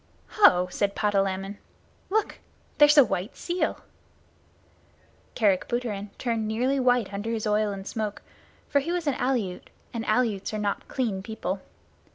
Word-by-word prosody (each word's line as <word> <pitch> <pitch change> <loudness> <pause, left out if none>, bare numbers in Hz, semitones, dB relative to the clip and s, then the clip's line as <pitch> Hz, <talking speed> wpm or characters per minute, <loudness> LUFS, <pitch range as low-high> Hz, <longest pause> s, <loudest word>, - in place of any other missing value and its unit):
"Ho!" 180 - +5
said 200 +2 0
Patalamon. 195 -1 0 0.5
"Look! 430 +2 0 0.4
There's 295 0 +7
a 285 - +10
white 190 +2 -3
seal!" 355 +1 -2 1.5
Kerick 200 -5 +2
Booterin 220 -5 -3
turned 230 -3 -1
nearly 250 +5 +1
white 245 -5 +2
under 205 +3 -3
his 225 -1 -2
oil 210 0 +2
and 195 -1 -6
smoke, 210 -1 -4 0.4
for 285 - +3
he 320 +5 -3
was 350 -2 -1
an 285 - +2
Aleut, 240 -8 -1 0.2
and 230 -1 -3
Aleuts 215 -3 +1
are - - -1
not 205 -1 -2
clean 225 -8 -2
people. 195 -3 -4
215 Hz, 145 wpm, -26 LUFS, 200-250 Hz, 1.5 s, a